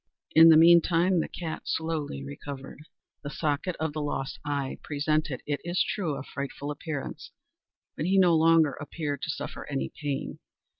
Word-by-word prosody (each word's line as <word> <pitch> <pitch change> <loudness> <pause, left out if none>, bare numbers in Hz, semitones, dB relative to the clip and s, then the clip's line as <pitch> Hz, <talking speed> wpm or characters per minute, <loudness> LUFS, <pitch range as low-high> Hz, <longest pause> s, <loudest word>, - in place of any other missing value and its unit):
In 165 +1 +9
the 160 - +8
meantime 170 +2 +5
the - - -1
cat 165 -3 -6
slowly 155 - -2
recovered. 135 - -8 0.4
The 145 - -6
socket 155 +4 -2
of 160 -1 -2
the 155 - -3
lost 135 -2 -3
eye 140 -2 -3
presented, 150 -1 -1
it 145 -1 -2
is 175 +1 +1
true, 170 -8 -2
a - - -6
frightful 140 +1 -5
appearance, 145 -1 -6 0.7
but 155 - -2
he 195 +1 +3
no 180 -3 +5
longer 160 -2 +4
appeared 145 +1 -5
to - - -4
suffer - - -5
any 65 0 -2
pain. 145 -2 -3
155 Hz, 160 wpm, -27 LUFS, 145-165 Hz, 0.7 s, In